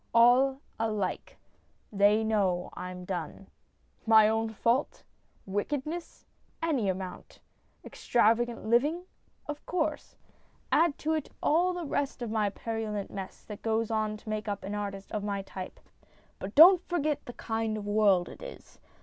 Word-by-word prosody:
All 255 +3 +5 0.2
alike. 215 -4 -2 0.5
They 205 +2 +4
know 195 -5 0
I'm 180 0 -7
done. 180 0 -5 0.6
My 220 -1 +7
own 225 +1 0
fault? 235 +5 0 0.4
Wickedness? 290 - -4 0.3
Any 280 -11 0
amount. 185 0 -6 0.5
Extravagant 235 0 +1
living? 290 +10 +2 0.4
Of 295 0 -6
course. 315 -4 -2 0.6
Add 330 -3 +3
to 315 +1 -1
it 310 -3 -2
all 345 +4 +3
the 355 -2 -4
rest 280 -3 -2
of 230 - -4
the 210 -2 +1
purulent 220 -3 -4
mess 195 -1 -7
that 210 -2 -9
goes 225 0 0
to 215 -1 -1
make 215 0 -3
up 205 -1 -3
an 200 - -5
artist 200 -1 -5
of 210 - -3
my 200 -1 -2
type. 190 -1 -8 0.6
But 195 +3 -7
don't 355 +4 +9
forget 305 -4 0
the 245 - -7
kind 225 -2 -2
of 205 - -6
world 205 -4 +3
it - - -11
is. - - -11
220 Hz, 140 wpm, -29 LUFS, 205-275 Hz, 0.6 s, don't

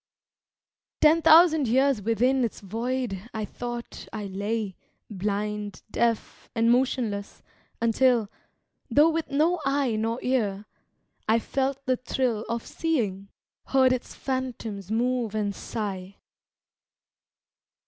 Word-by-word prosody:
Ten 315 +2 +6
thousand 320 -3 +6
years 265 0 +3
within 245 +5 +2
its 230 - -2
void 225 0 -3
I 215 -1 -2
thought 240 +2 -7
I 215 -2 -5
lay, 200 +1 -3 0.4
blind, 205 +1 -3
deaf, 230 -2 -1
and 230 0 +3
motionless, 240 -5 0 0.4
until 230 -1 +3 0.6
Though 295 +6 +5
with 320 -2 -2
no 315 +4 +2
eye 275 -4 +1
nor 225 +2 -1
ear 215 -6 0 0.6
I 225 - +5
felt 270 +3 -2
the 255 -1 +2
thrill 240 -3 -1
Of 235 0 -2
seeing, 210 - -2 0.4
heard 260 -1 +4
its 255 - -5
phantoms 240 -7 -4
move 235 -1 0
and 205 -2 0
sigh. 195 -3 -5
235 Hz, 110 wpm, -26 LUFS, 210-260 Hz, 0.6 s, Ten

